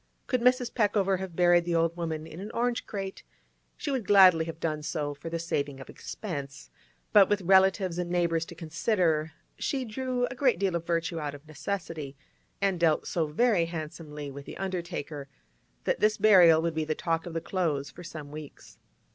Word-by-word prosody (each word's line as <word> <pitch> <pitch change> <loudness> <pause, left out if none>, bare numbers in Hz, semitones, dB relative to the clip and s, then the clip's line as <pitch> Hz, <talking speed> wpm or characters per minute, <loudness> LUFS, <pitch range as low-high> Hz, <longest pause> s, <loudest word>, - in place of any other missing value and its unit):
Could 255 -2 0
Mrs. 250 0 +3
Peckover 205 -4 +2
have 190 -3 -6
buried 175 0 +5
the 170 0 -1
old 165 0 +2
woman 160 -2 -3
in 160 +1 -10
an 200 +3 -6
orange 240 0 0
crate, 195 -2 -5 0.6
she 290 - -3
would 255 -7 -2
gladly 185 -5 +7
have 165 0 -7
done 155 -2 -2
so 150 -1 -3
for 145 +3 -8
the 165 - -2
saving 145 -4 -2
of 135 - -10
expense; 140 -8 -7 0.4
but 200 -3 +7
with 205 -2 +1
relatives 190 -1 +4
and 175 -1 -2
neighbours 170 -2 +1
to 170 - -11
consider, 165 -1 0 0.3
she 265 -2 -1
drew 250 +2 -1
a 245 - -5
great 255 -1 +2
deal 195 -3 0
of 170 -1 -3
virtue 165 -1 -1
out 145 -2 -4
of 145 +2 -15
necessity, 155 -4 -5 0.4
and 195 -3 +1
dealt 160 -3 +2
so 165 -3 -1
very 185 +2 +2
handsomely 155 -3 -6
with 140 +1 -9
the - - -9
undertaker, 170 -6 -4 0.6
that - - 0
this 215 0 +3
burial 180 -6 +7
would 170 -1 0
be 160 0 -1
the 155 0 -2
talk 165 +1 -1
of 170 - -6
the - - +1
Close 155 -6 -2
for 180 - -11
some 155 -4 -8
weeks. 150 -1 -11
170 Hz, 190 wpm, -28 LUFS, 155-195 Hz, 0.6 s, gladly